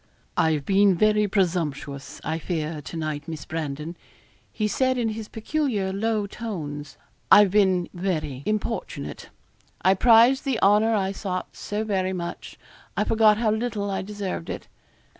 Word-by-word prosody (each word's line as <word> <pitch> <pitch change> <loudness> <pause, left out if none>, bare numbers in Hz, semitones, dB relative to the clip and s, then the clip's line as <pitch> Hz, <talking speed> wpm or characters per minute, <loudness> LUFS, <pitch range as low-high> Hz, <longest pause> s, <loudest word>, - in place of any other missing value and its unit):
'I've 155 -3 +1
been 195 -1 +4
very 210 +3 +3
presumptuous, 165 -8 -2
I 160 +1 -2
fear, 160 -2 -3
to 165 - -7
night, 155 -1 -3
Miss 160 -3 -6
Brandon, 155 +1 -4 0.6
he 215 - -1
said, 260 +4 +1
in 235 -2 +1
his 220 0 -5
peculiar 220 -5 -1
low 215 +1 0
tones. 155 -10 -6 0.3
'I've 205 -2 +8
been 190 -3 +3
very 155 -7 -2
importunate 215 +2 -3 0.5
I 190 - +6
prized 235 +6 +5
the 265 -5 0
honour 210 +3 +4
I 195 -2 0
sought 185 -2 -4
so 210 +1 -3
very 190 -3 0
much, 170 -2 -6 0.4
I - - +3
forgot 220 -1 +4
how 220 -1 +2
little 215 -2 -2
I 190 - -1
deserved 195 - -5
it. - - -6
195 Hz, 145 wpm, -25 LUFS, 165-215 Hz, 0.6 s, I've